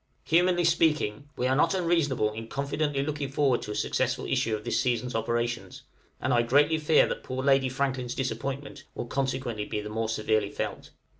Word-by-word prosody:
Humanly 175 +1 +3
speaking, 150 -6 +1
we 125 - 0
are 130 +1 +2
not 150 - +3
unreasonable 165 - +1
in 110 +1 -7
confidently 140 +2 -1
looking 145 -2 -3
forward 135 -3 +2
to 105 - -6
a - - -4
successful - - 0
issue 110 -1 0
of 105 - -7
this - - 0
season's 125 0 -1
operations, 120 +1 -2 0.4
and 130 - 0
I 120 - +4
greatly 145 +6 +3
fear 155 0 +4
that - - -4
poor 130 0 -4
Lady 135 -1 +4
Franklin's 130 -2 -2
disappointment 135 +2 -4
will - - -4
consequently 130 -4 -2
be 105 - -3
the 105 0 -6
more 110 +1 -2
severely 110 -2 +1
felt. - - -5
130 Hz, 180 wpm, -28 LUFS, 115-145 Hz, 0.4 s, I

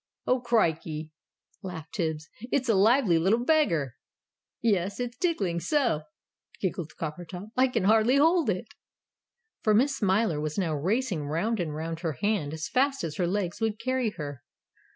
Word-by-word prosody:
"Oh, 255 - +2
crikey!" 160 -9 0 0.5
laughed 175 -5 -7
Tibbs. 160 -4 -2 0.2
"It's 260 -2 +1
a 225 - +4
lively 205 -3 +4
little 220 +8 +2
beggar!" 170 - +2 0.6
"Yes. 200 -3 0
It's 245 -1 -3
tiggling 205 - 0
so!" 235 - +1 0.6
giggled 175 -4 -3
Coppertop. 175 +5 -6
"I 260 +1 +4
can 230 -5 -1
hardly 220 +5 +4
hold 320 -1 +4
it!" 185 -2 -2 0.9
For 215 -1 +3
Miss 270 +5 +3
Smiler 195 - +1
was 155 0 -3
now 175 -5 0
racing 180 - -1
round 195 +9 0
and 155 -4 -2
round 160 +1 -4
her 165 -3 -2
hand 195 - -1
as 160 0 -4
fast 270 -1 +1
as 160 -2 -4
her 180 - +1
legs 185 +1 -2
would 220 -1 0
carry 255 0 0
her. 145 -4 -6
195 Hz, 155 wpm, -28 LUFS, 160-240 Hz, 0.9 s, a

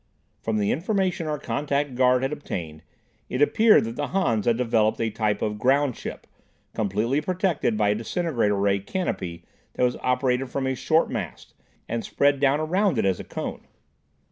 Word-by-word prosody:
From 110 -1 -1
the 105 -1 +1
information 185 0 0
our 150 -1 -1
contact 145 -1 -2
guard 125 0 +3
had 135 +3 -1
obtained, 80 - -6 0.5
it 130 - -2
appeared 215 +9 +5
that 115 +1 -5
the 145 - -1
Hans 120 - 0
had 115 -1 +3
developed 115 -3 +1
a 115 -1 0
type 105 -1 -1
of 105 -1 -2
"groundship" 135 0 0 0.5
completely 110 +7 0
protected 175 - 0
by 105 -1 +2
a - - +4
disintegrator 115 - 0
ray 100 0 +2
"canopy" 95 - -4 0.3
that - - -1
was 125 0 +2
operated 125 0 0
from 135 +1 -2
a 130 - 0
short 160 +5 +1
mast, - - -6 0.3
and 115 0 -2
spread 140 0 +2
down 140 +1 +3
around 180 - +1
it 110 - +1
as 95 -2 +1
a - - -5
cone. - - -6
125 Hz, 170 wpm, -25 LUFS, 110-150 Hz, 0.5 s, appeared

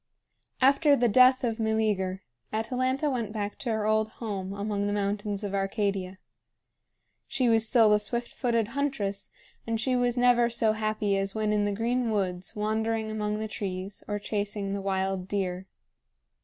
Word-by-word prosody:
After 280 +3 +5
the 245 -2 +2
death 255 +3 +6
of 230 -2 -1
Meleager, 210 -4 0 0.3
Atalanta 255 +6 0
went 240 -7 -1
back 205 -1 -4
to 245 - -4
her 220 -1 -1
old 215 0 +2
home 195 -4 -4
among 200 0 -2
the 205 - -1
mountains 205 0 -2
of 200 -1 -3
Arcadia. 195 -1 -1 1.1
She 260 -2 0
was 225 -1 +3
still 225 -2 +5
the 210 - +5
swift 235 +3 -3
footed 230 -3 0
huntress, 220 -8 -2 0.4
and 225 -1 -1
she 255 +3 +1
was 245 0 +1
never 245 -1 +4
so 230 -2 +2
happy 215 -2 0
as 195 +1 -2
when 215 -1 0
in 205 -1 +2
the 205 - 0
green 235 +3 0
woods 185 -4 -2
wandering 220 +1 -1
among 210 -1 -2
the 220 0 -3
trees 195 -1 -5
or 205 - -1
chasing 205 -1 -3
the 200 - -3
wild 190 -1 -1
deer. 190 -2 -2
215 Hz, 165 wpm, -28 LUFS, 200-230 Hz, 1.1 s, death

